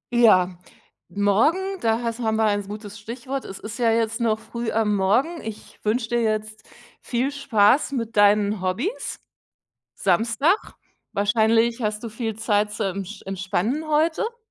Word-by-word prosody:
Ja, 185 -6 +4 0.5
morgen, 305 - +1
da 225 +1 +1
has 230 0 -3
haben 220 -2 0
wir 220 - +2
ein 205 -1 0
gutes 210 +1 -8
Stichwort. 255 +5 -5
Es 195 - -7
ist 215 +3 -8
ja 230 -2 +3
jetzt 225 +1 0
noch 220 -2 +2
früh 235 0 -5
am 215 -2 +1
Morgen. 245 - +1
Ich 220 -1 -9
wünsche 225 +2 0
dir 240 0 +1
jetzt 215 -1 -2 0.3
viel 255 +4 -1
Spaß 270 0 +3
mit 230 -3 -3
deinen 205 -1 +4
Hobbys. 235 - -2 0.8
Samstag. 230 - +1 0.4
Wahrscheinlich 225 +3 +2
hast 215 0 -2
du 230 - -5
viel 220 -1 -4
Zeit 210 -2 +1
zum 210 -1 -2
ensch 195 +2 -7
entspannen 195 - -2
heute? 325 +10 +1
225 Hz, 150 wpm, -23 LUFS, 205-240 Hz, 0.8 s, Ja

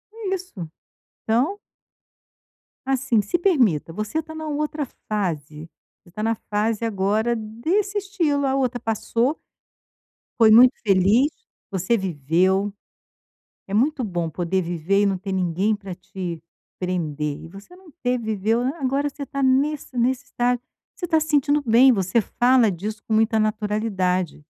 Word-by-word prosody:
É 405 -4 -2
isso, 240 - -8 0.6
então 260 - +2 1.3
assim, 260 -4 +2
se 205 - -1
permita. 240 - +2
Você 215 - -2
tá 315 0 -11
na 315 0 -5
outra 300 0 -2 0.2
fase. 160 -6 -3 0.3
Você 175 - -20
tá 210 - -6
na 225 +1 +1
fase, 215 +2 0
agora, 220 +2 +1
desse 315 - -1
estilo. 340 -8 0
A 265 0 +1
outra 255 -2 0
passou 230 +5 -1 1.0
foi 225 -2 +6
muito 245 +4 +8
feliz, 205 +8 +4 0.4
você 190 +5 +1
viveu. 190 +3 +1 0.9
É 195 - -7
muito 260 +5 +2
bom 175 -6 -2
poder 175 +4 -1
viver 175 +3 0
e - - +3
não 195 -1 +1
ter 195 +2 -6
ninguém 190 +3 +1
para 200 -3 -8
te 175 -2 -6 0.4
prender, 155 -5 -2
e - - -9
você 195 - -13
não 365 -3 -17
te 250 -6 -1
viveu. 220 0 0
Agora 275 +1 -1
você 285 0 -7
tá 275 0 -3
nesse 270 +1 +1
nesse 255 +3 +1
estágio. 245 -2 0 0.4
Você 350 - -4
tá 320 -1 +3
se 315 - -3
sentindo 295 -1 +2
bem. 250 +1 +6
Você 195 0 +1
fala 245 0 +3
disso 210 +4 -5
com 220 - -1
muita 220 0 +3
naturalidade. 210 -6 -1
220 Hz, 145 wpm, -23 LUFS, 190-270 Hz, 1.3 s, muito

